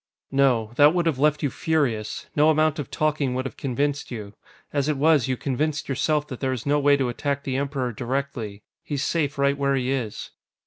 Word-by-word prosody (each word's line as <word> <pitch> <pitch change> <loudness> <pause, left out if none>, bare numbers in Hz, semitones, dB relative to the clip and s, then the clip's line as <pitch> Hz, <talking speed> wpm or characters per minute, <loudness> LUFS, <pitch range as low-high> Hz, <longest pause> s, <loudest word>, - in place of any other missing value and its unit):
"No. 130 -5 +2
That 150 +3 +6
would 175 -1 +1
have 155 -6 0
left 150 +1 +2
you 140 - +1
furious. 135 -10 -1
No 150 +1 +5
amount 155 0 +2
of 140 - -4
talking 150 -4 0
would 130 +1 -2
have 135 - -5
convinced 145 +1 -2
you. 105 -4 -7 0.4
As 145 0 +1
it 150 - 0
was, 150 -2 +4
you 130 -1 -1
convinced 145 +4 -1
yourself 150 +2 0
that 130 - -6
there 135 -1 0
is 125 - -5
no 145 +1 +2
way 145 0 +4
to 135 -2 0
attack 140 +3 -2
the 130 -2 -2
Emperor 135 -3 -2
directly. 120 -4 -4 0.2
He's 145 -2 -3
safe 145 -5 0
right 140 0 +2
where 140 -1 +2
he 130 0 0
is." 125 -6 -3
140 Hz, 210 wpm, -24 LUFS, 130-150 Hz, 0.4 s, That